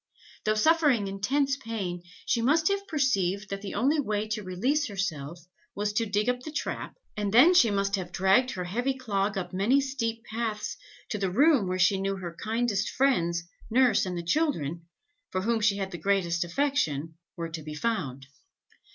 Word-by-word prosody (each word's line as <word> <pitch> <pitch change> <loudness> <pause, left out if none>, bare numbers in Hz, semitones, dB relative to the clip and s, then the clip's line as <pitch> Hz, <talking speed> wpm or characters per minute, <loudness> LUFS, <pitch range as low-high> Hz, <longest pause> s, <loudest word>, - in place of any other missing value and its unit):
Though 215 0 +2
suffering 285 -4 +3
intense 270 +9 0
pain, 205 -9 -4 0.2
she 235 - +1
must 310 +8 +3
have 395 0 -1
perceived 200 - 0
that 195 0 -3
the 200 - -6
only 275 +9 +2
way 215 -5 -1
to 215 0 -2
release 245 +11 0
herself, 170 - -4 0.3
was 205 +1 -1
to 225 +1 0
dig 205 +2 0
up 250 0 +1
the 310 +5 -8
trap, - - -4 0.2
and 205 -1 -2
then 260 - +7
she 350 -11 +6
must 200 0 +1
have 180 -2 -6
dragged 190 +8 +3
her 180 - -4
heavy 245 +9 -1
clog 200 -5 -1
up 185 - -4
many 210 +9 +3
steep 235 -5 -2
paths 220 -2 -3 0.3
to 210 - -3
the 195 -1 0
room 270 - +4
where 185 0 -1
she 190 +1 +3
knew 195 0 -1
her 175 -3 -7
kindest 220 -2 0
friends, 170 -11 +1 0.3
nurse 255 +1 +4
and 180 -1 -3
the 170 - -4
children, 170 - -1 0.4
for 185 0 -2
whom 230 +1 +1
she 210 -2 +3
had 195 -1 -3
the 175 - -6
greatest 175 -2 +1
affection, 170 - -1 0.2
were 165 -1 -4
to 165 0 -6
be 150 0 -7
found. 150 - -2
205 Hz, 185 wpm, -28 LUFS, 185-250 Hz, 0.4 s, then